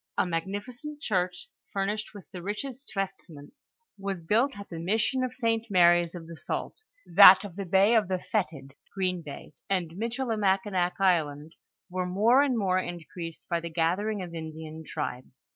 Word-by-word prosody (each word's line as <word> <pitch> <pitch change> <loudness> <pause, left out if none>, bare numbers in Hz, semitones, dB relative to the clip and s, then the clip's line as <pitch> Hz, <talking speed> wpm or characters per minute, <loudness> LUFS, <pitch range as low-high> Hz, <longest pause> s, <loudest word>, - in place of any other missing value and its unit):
A - - +3
magnificent 205 - -4
church, 185 - -1 0.2
furnished 205 +2 -2
with 200 - -10
the 180 - -7
richest 245 +7 -5
vestments, 195 - -6 0.3
was 195 -3 -4
built 235 +10 +2
at 200 - -8
the 165 - -7
mission 220 +9 0
of 255 - -1
St. 230 -3 -1
Mary's 175 -2 +4
of 170 -2 -8
the 165 - -10
jault; 300 - -4 0.2
that - - +9
of 195 -4 -8
the 200 0 -4
bay 195 +5 +4
of 220 -4 +4
the 185 0 0
Fetid 160 -9 -3 0.2
(Green 185 -2 -1
bay), 150 0 -9 0.2
and 180 -4 0
Michilimakinak 205 -4 0
island, 160 -5 +1 0.3
were 185 0 -2
moi*e 230 +10 +4
and 255 -3 0
more 185 -3 +2
increased 170 -1 -7
by 170 - 0
the 170 0 -6
gathering 185 +6 0
of 175 -2 -8
Indian 160 -1 -7
tribes. 130 -4 -6
185 Hz, 160 wpm, -28 LUFS, 170-215 Hz, 0.3 s, that